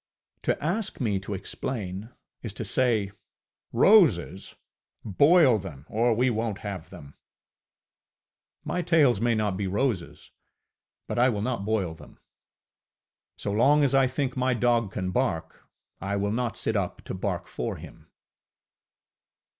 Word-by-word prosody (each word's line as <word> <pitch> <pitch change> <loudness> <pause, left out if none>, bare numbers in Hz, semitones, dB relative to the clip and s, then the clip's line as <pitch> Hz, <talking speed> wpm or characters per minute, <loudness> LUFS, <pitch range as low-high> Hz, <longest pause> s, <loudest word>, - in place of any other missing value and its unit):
To - - -1
ask 190 +7 -1
me 105 -6 0
to 100 +1 -5
explain, 100 0 -5 0.3
is 110 -5 -5
to 110 - -5
say, 110 -3 +1 0.6
ŌĆ£Roses! 145 - +4 0.5
Boil 140 - +5
them, 75 -8 -9
or 115 +1 +2
we 125 +3 +2
wonŌĆÖt 110 -3 -2
have 100 -6 -7
them! 70 0 -12
ŌĆØ - - -52
My 180 - -1
tales 150 - +3
may 120 -1 +2
not 105 -3 -1
be 100 -1 -2
roses, 100 -2 -2 0.8
but - - -2
I 125 +2 +5
will 105 -4 -2
not 120 -4 -2
boil 100 -6 0
them. 80 - -15 1.2
So 100 - -3
long 140 +8 +4
as 135 -1 +2
I 135 -1 +5
think 130 0 -2
my 130 -1 +1
dog 120 -3 +1
can 95 -3 -3
bark, 90 -9 -2 0.3
I 100 +1 -2
will 100 0 0
not 120 -1 -2
sit 110 - -1
up 95 -4 -2
to - - -6
bark - - -3
for - - -4
him. - - -13
110 Hz, 145 wpm, -26 LUFS, 100-130 Hz, 1.2 s, Boil